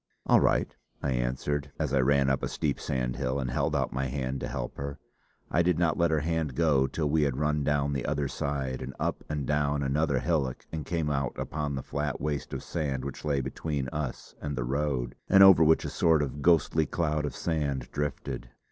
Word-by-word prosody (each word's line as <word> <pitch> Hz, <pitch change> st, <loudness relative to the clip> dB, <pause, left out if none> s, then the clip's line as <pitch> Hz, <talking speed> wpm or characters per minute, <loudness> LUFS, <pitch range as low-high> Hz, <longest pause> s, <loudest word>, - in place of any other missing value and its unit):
"All -, -, +6 dB
right," -, -, +1 dB, 0.3 s
I 70 Hz, -, 0 dB
answered, 65 Hz, +4 st, -1 dB
as 75 Hz, -4 st, -1 dB
I 70 Hz, -, +4 dB
ran 70 Hz, +1 st, +3 dB
up 65 Hz, 0 st, +1 dB
a -, -, -1 dB
steep -, -, -1 dB
sandhill 65 Hz, +1 st, -1 dB
and 65 Hz, -2 st, -2 dB
held -, -, 0 dB
out -, -, 0 dB
my 65 Hz, 0 st, -1 dB
hand 65 Hz, 0 st, -3 dB
to -, -, -3 dB
help -, -, -5 dB
her. 70 Hz, 0 st, -4 dB, 0.5 s
I 85 Hz, -, +3 dB
did 85 Hz, -1 st, +2 dB
not 85 Hz, -2 st, +2 dB
let 85 Hz, -1 st, +2 dB
her 80 Hz, -2 st, +1 dB
hand 80 Hz, -4 st, -1 dB
go 70 Hz, -4 st, +3 dB
till 75 Hz, +2 st, -1 dB
we 75 Hz, +2 st, +2 dB
had 70 Hz, -3 st, +1 dB
run 75 Hz, 0 st, +1 dB
down 70 Hz, -1 st, +1 dB
the 70 Hz, -3 st, -2 dB
other 75 Hz, -1 st, 0 dB
side, 65 Hz, -2 st, -3 dB
and 65 Hz, +1 st, -6 dB
up -, -, -1 dB
and 75 Hz, -2 st, -2 dB
down 75 Hz, 0 st, +1 dB
another 70 Hz, +1 st, +1 dB
hillock 70 Hz, -3 st, -1 dB
and 80 Hz, -4 st, -5 dB
came 80 Hz, -4 st, 0 dB
out 70 Hz, -3 st, -1 dB
upon 75 Hz, -2 st, -3 dB
the 65 Hz, -, -4 dB
flat 75 Hz, -1 st, -3 dB
waste 75 Hz, -1 st, -3 dB
of -, -, -4 dB
sand 70 Hz, -6 st, -2 dB
which 70 Hz, -, -6 dB
lay 70 Hz, -2 st, +1 dB
between 70 Hz, -1 st, -3 dB
us 75 Hz, -2 st, -5 dB
and 75 Hz, -1 st, -3 dB
the 65 Hz, -, -1 dB
road, 70 Hz, -1 st, -1 dB, 0.2 s
and 95 Hz, 0 st, +8 dB
over 95 Hz, -4 st, +9 dB
which 80 Hz, +1 st, +4 dB
a -, -, -2 dB
sort 80 Hz, -3 st, +3 dB
of 70 Hz, +1 st, -5 dB
ghostly 80 Hz, -1 st, +3 dB
cloud 75 Hz, -3 st, 0 dB
of 75 Hz, -, -3 dB
sand 70 Hz, -6 st, -1 dB
drifted. 75 Hz, -2 st, -3 dB
70 Hz, 215 wpm, -28 LUFS, 65-75 Hz, 0.5 s, over